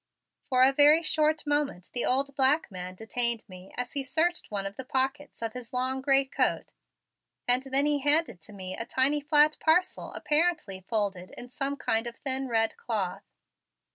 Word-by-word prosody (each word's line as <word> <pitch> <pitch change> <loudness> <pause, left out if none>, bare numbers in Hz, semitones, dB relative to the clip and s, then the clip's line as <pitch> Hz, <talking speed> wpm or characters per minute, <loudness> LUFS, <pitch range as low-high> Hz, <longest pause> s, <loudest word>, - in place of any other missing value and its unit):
For 255 -1 +4
a 270 +1 +5
very 295 +4 +5
short 310 -1 +1
moment 290 -11 -2
the 245 - -1
old 275 +2 0
black 275 0 +2
man 185 0 -7
detained 235 +2 -1
me 185 -1 -13
as 245 0 -4
he 280 - -2
searched 330 +7 0
one 200 -2 -4
of 195 0 -6
the 265 - -7
pockets 270 +1 -3
of 225 - -3
his 250 -1 -10
long 260 +1 -1
gray 270 0 +4
coat 270 - -1 0.7
and 245 +1 +5
then 270 +1 +2
he 295 -1 +1
handed 290 - +3
to 210 - -13
me 185 -2 -7
a - - -4
tiny 265 +5 +1
flat 295 +1 +3
parcel 360 +4 0
apparently 300 - 0
folded 200 -5 -2
in 245 - -9
some 275 +2 -2
kind 225 -2 -1
of 235 - -7
thin 265 0 -1
red 225 -2 0
cloth. 195 - -4
260 Hz, 180 wpm, -27 LUFS, 225-290 Hz, 0.7 s, a